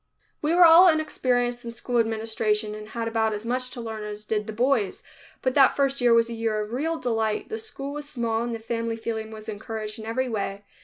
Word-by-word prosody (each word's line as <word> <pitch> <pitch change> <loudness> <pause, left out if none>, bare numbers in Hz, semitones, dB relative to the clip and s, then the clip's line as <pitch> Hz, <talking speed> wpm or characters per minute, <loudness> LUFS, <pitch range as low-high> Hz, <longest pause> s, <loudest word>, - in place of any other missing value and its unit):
We 310 +3 +1
were 355 0 +8
all 335 +3 +9
inexperienced 245 -6 0
in 235 - -6
school 235 +1 -2
administration 220 -1 0
and 215 0 -8
had 230 0 -3
about 225 -1 +1
as 210 +1 -5
much 255 +2 -1
to 250 -1 -7
learn 220 -2 -5
as 210 0 -7
did 210 -1 -1
the - - -3
boys, 235 -3 0 0.4
but 260 - +1
that 270 -1 +5
first 275 -1 +1
year 240 -1 +4
was 230 0 +5
a 235 - -5
year 225 -2 -1
of 210 +2 -4
real 320 +6 -1
delight. 225 -5 -1
The 445 - -3
school 285 -11 -6
was 295 0 -6
small 230 -5 -1
and 235 0 -2
the - - -6
family 230 0 -2
feeling 225 -1 -4
was 215 0 -10
encouraged 215 0 -5
in 220 - -7
every 255 +3 -1
way. 200 -3 -3
230 Hz, 225 wpm, -25 LUFS, 220-255 Hz, 0.4 s, all